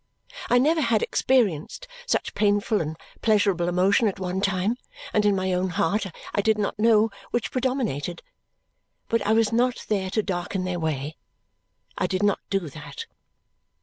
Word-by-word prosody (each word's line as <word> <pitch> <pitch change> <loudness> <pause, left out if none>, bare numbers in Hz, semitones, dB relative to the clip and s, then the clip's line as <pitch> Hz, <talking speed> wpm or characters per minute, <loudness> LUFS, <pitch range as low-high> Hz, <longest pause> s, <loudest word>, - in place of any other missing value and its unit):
I 245 - +5
never 310 +6 +3
had 230 -5 +2
experienced 240 - +1 0.2
such - - 0
painful 205 +1 +2
and 155 0 -4 0.2
pleasurable 200 -5 +2
emotion 190 +5 +3
at 200 -1 -2
one 185 0 -2
time, 195 +4 0 0.4
and 210 -1 +3
in 205 - +3
my 190 -1 0
own 180 +1 0
heart 185 +4 0 0.3
I 205 - +2
did 220 +1 +2
not 205 0 -2
know 220 -1 +4 0.2
which 240 -2 -2
predominated. 240 - -2 0.9
But 230 -1 +2
I 220 - +4
was 225 0 +2
not 245 +1 +1
there 195 -3 0
to 215 +3 0
darken 185 0 -2
their 180 -1 -2
way; 155 -1 -3 0.8
I - - +1
did 185 +1 -1
not 205 -1 +2
do 195 -4 -1
that. 155 - -8
200 Hz, 160 wpm, -25 LUFS, 180-225 Hz, 0.9 s, I